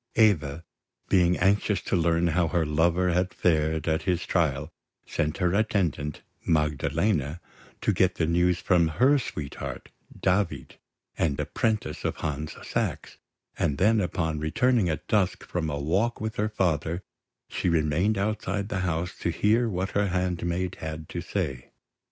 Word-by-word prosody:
Eva, 85 -9 +3 0.5
being 90 -1 +4
anxious 100 +2 +2
to - - -2
learn 85 0 +2
how 85 +1 +2
her 85 0 +1
lover 85 +4 +2
had 90 +2 +1
fared 80 -2 +1
at 80 0 +1
his 90 -3 -1
trial, 75 -3 0 0.3
sent 75 +1 -1
her 90 -2 +1
attendant, 90 -8 0 0.2
Magdalena, 75 +1 0 0.4
to - - +2
get 95 -1 +2
the 80 - +1
news 90 +2 +2
from 85 -1 +3
her 140 +5 +5
sweetheart, 75 - -6 0.3
David, 90 -8 0 0.4
the 75 -4 +2
apprentice 110 -2 -1
of - - -1
Hans 75 0 -4
Sachs; - - -3 0.4
and 70 - +1
then, 110 +6 +4
upon 80 -4 -1
returning 100 +6 +2
at 80 - -3
dusk 100 -4 +1
from 85 -3 -2
a 70 -1 -2
walk 95 +11 0
with 110 0 -4
her 105 +1 +1
father, 85 -3 0 0.4
she - - -1
remained 85 +6 +2
outside 100 0 -1
the 100 - -1
house, 90 -1 -2
to - - -1
hear 110 +7 +2
what 95 0 -2
her 100 0 +1
handmaid 90 0 -1
had 80 0 -5
to - - -4
say. 65 -2 -4
85 Hz, 150 wpm, -27 LUFS, 80-95 Hz, 0.5 s, her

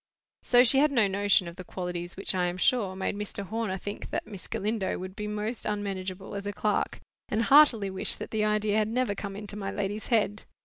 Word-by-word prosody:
So 245 0 +6
she 265 +2 +5
had 295 +1 +4
no 235 -7 +4
notion 200 -2 +3
of 170 +1 -9
the 185 - -7
qualities 175 -1 -5
which, 195 - +1
I 180 -1 +1
am 175 +1 -3
sure, 195 -1 +2
made 190 +1 -2
Mr. 205 -1 -4
Horner 215 -1 -2
think 205 +2 -6
that - - -2
Miss 205 -4 -9
Galindo 210 -1 -1
would 185 +1 -7
be 210 0 -4
most 210 +3 -3
unmanageable 195 -2 -4
as 200 0 -4
a 205 - -2
clerk, 210 0 -1 0.3
and 220 +2 +1
heartily 245 -8 +6
wish 190 - -1
that - - -7
the 215 -1 +1
idea 210 0 +2
had 215 - +1
never 245 -1 0
come 200 -1 -6
into 205 0 -6
my 195 -2 -4
lady's 200 +1 -3
head. 215 -3 +1
205 Hz, 220 wpm, -28 LUFS, 190-215 Hz, 0.3 s, So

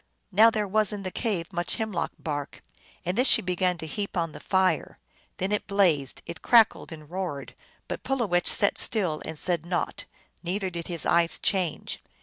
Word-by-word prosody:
Now 220 +4 +7
there 215 -2 -1
was 215 +1 +2
in 205 -2 -5
the 185 - -4
cave 195 -6 -2
much 175 -1 -1
hemlock 220 -6 -2
bark, 145 -2 -5 0.4
and 180 +2 -1
this 250 +4 +4
she - - +6
began 180 0 0
to 160 - -7
heap 200 +5 -4
on 165 -2 0
the - - -10
fire. 190 -1 0 0.4
Then 190 +1 -2
it 210 - -1
blazed, 175 -10 +1
it 170 0 -8
crackled 230 -6 +4
and 155 -2 -10
roared; 175 -5 -5 0.3
but - - -5
Pulowech 215 -10 0
sat 200 - +3
still, 180 -9 +1
and 160 - -6
said 170 0 +2
naught, 175 +1 -3 0.4
neither 185 +2 -2
did 170 -1 -6
his 170 -3 0
eyes 170 0 +2
change. 185 -6 -2
180 Hz, 180 wpm, -26 LUFS, 170-205 Hz, 0.4 s, Now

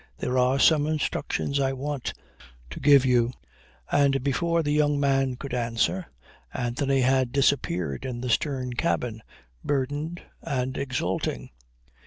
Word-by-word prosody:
There 125 +1 0
are 125 +2 +3
some 150 +1 +4
instructions 150 -2 -1
I 135 -1 +1
want 140 0 -4 0.6
to - - -6
give 140 -1 +6
you." 125 -1 +2 0.6
And 135 -2 +3
before 165 +4 +1
the 145 - -1
young 145 -1 +2
man 135 -2 +1
could 135 +1 -7
answer, 120 - 0 0.4
Anthony 130 +3 0
had 130 -1 +2
disappeared 90 - 0
in 120 -2 -4
the 125 - -3
stern 130 -1 -1
cabin, 120 -5 -1 0.4
burdened 145 +5 -2 0.2
and 130 -1 -2
exulting. 95 - -2
135 Hz, 130 wpm, -26 LUFS, 125-145 Hz, 0.6 s, give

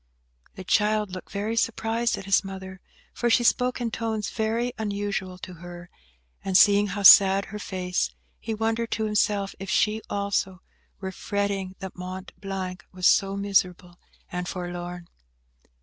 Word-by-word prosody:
The 190 - -8
child 210 +1 +1
looked 185 0 -8
very 210 +3 -2
surprised 230 +1 0
at 195 - -8
his 195 +1 +3
mother; 190 -1 -8 0.3
for 240 - 0
she 240 +1 +4
spoke 250 +1 +2
in 235 -2 -2
tones 220 -2 -2
very 230 +2 -1
unusual 200 -3 -3
to 185 0 -9
her; 175 0 -10 0.5
and 190 -1 +3
seeing 205 +1 +6
how 200 +1 -4
sad 195 0 +8
her 210 +1 -7
face, 185 -2 -2 0.3
he 225 -1 -4
wondered 225 +1 -1
to 220 - -1
himself 205 -2 +1
if 195 0 -6
she, 215 +3 +2
also, 200 -2 -2 0.4
were 190 -1 -4
fretting 200 -1 -2
that 190 -1 -7
Mont 185 +1 -7
Blanc 185 -2 -5
was 185 -1 -4
so 195 0 +4
miserable 185 -3 0 0.3
and 180 0 -3
forlorn. 175 -1 -6
195 Hz, 150 wpm, -26 LUFS, 185-215 Hz, 0.5 s, sad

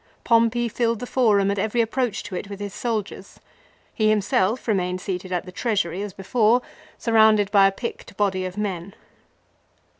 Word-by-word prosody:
Pompey 230 +1 +3
filled 230 0 0
the 245 - -6
Forum 210 -6 +2
and 200 - -2
every 220 +4 -1
approach 230 -1 0
to 195 - -7
it 195 +3 -5
with 200 -1 -7
his 205 -2 -5
soldiers. 215 -4 -4 0.5
He 215 -1 +2
him 215 - +3
self 205 +4 0
remained 185 -4 0
seated 185 -1 -5
at 180 -1 -2
the 185 - -9
Treasury 195 -4 -1
as 205 -1 -4
before, 220 +5 +2 0.3
surrounded 220 -3 +4
by 200 -1 +6
a - - +1
picked 215 -1 -7
body 195 -2 0
of 185 +2 -6
men. 195 -3 -4
205 Hz, 175 wpm, -23 LUFS, 195-230 Hz, 0.5 s, by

